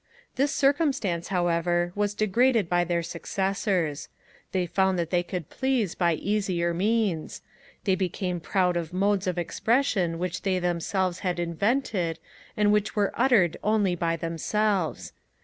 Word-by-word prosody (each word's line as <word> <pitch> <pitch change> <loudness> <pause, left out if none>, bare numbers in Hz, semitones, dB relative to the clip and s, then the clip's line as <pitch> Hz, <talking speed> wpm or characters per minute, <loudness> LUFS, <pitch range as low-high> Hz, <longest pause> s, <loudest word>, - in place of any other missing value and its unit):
This 275 +2 +1
circumstance, 275 - +1
however, 175 -1 +1
was 205 0 -1
disregarded 220 0 +2
by 175 +1 +2
their 170 -1 -1
successors; 185 -3 -2 0.4
they 185 -2 0
found 190 +1 +1
that 170 -1 -2
they 175 -1 +3
could 175 -3 -6
please 255 -9 0
by 170 -2 +1
easier 185 -2 -1
means: 200 -3 -1 0.4
they 195 - +2
became 185 -1 -2
proud 180 +1 +1
of 170 -1 -3
modes 195 +1 +1
of 180 -1 -1
expression 190 -2 +1
which 180 0 -3
they 190 -2 0
themselves 180 +1 -1
had 180 -2 -2
invented, 175 - 0 0.4
and 210 -1 +4
which 210 0 0
were 205 -2 +1
uttered 230 -10 +3
only 210 -3 +2
by 170 -1 0
themselves. 175 +2 -1
185 Hz, 140 wpm, -26 LUFS, 175-210 Hz, 0.4 s, and